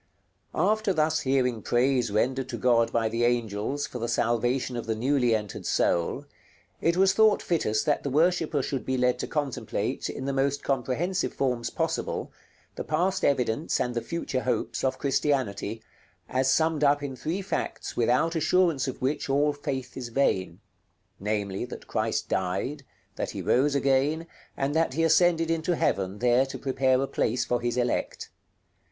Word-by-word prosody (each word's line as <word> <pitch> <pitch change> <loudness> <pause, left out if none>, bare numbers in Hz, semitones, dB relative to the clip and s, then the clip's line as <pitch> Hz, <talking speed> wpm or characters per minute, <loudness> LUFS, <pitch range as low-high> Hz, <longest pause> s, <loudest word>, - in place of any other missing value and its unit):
§ - - -42 0.6
LXVIII. - - +4
After 215 -2 0
thus 155 -1 +2
hearing 125 -4 +1
praise 125 +1 +2
rendered 130 +6 0
to - - -4
God 115 -2 +3
by 115 -1 +1
the 115 +2 -1
angels 120 +3 0
for 125 - -7
the 115 - -2
salvation 120 +2 0
of 115 -1 -5
the 110 - 0
newly 125 0 +2
entered 105 -2 -5
soul, 85 -1 +1 0.6
it 170 +1 +2
was 190 0 +5
thought 215 +1 +5
fittest 110 -11 0
that 150 - +1
the 140 - -3
worshipper 160 -1 +2
should 135 -1 -3
be 130 0 -1
led 125 0 +2
to - - -3
contemplate, 145 -4 -2
in 130 - -5
the 140 - -1
most 140 +1 0
comprehensive 140 +8 -1
forms 125 -3 -1
possible, - - -2 0.4
the - - -5
past 185 +5 0
evidence 130 +1 +1
and 125 - -1
the 120 - -1
future 130 0 -3
hopes 125 -4 -2
of 130 -1 0
Christianity, 130 -6 -1 0.4
as 130 +1 +1
summed 160 0 +2
up 145 0 +3
in 135 -2 -4
three 170 +9 -3
facts 195 - -4
without 125 +8 +2
assurance 160 -3 +2
of 130 - -5
which 140 +1 -1
all 145 +2 +2
faith 135 -3 -5
is 125 -3 -5
vain; 95 -9 0 0.6
namely 100 -1 -2
that 120 - -8
Christ - - -1
died, 95 +11 -2 0.4
that - - -2
He - - -5
rose 140 +3 +2
again, 140 +4 +2 0.3
and 135 +1 -1
that 160 -4 +1
He 165 - +1
ascended 165 0 +3
into 165 +1 0
heaven, 95 - 0
there 125 +3 +3
to 130 - -6
prepare 130 -1 +1
a - - -2
place 120 -1 0
for 120 -1 0
His 120 0 -1
elect. 120 -1 -2
130 Hz, 170 wpm, -27 LUFS, 120-150 Hz, 0.6 s, was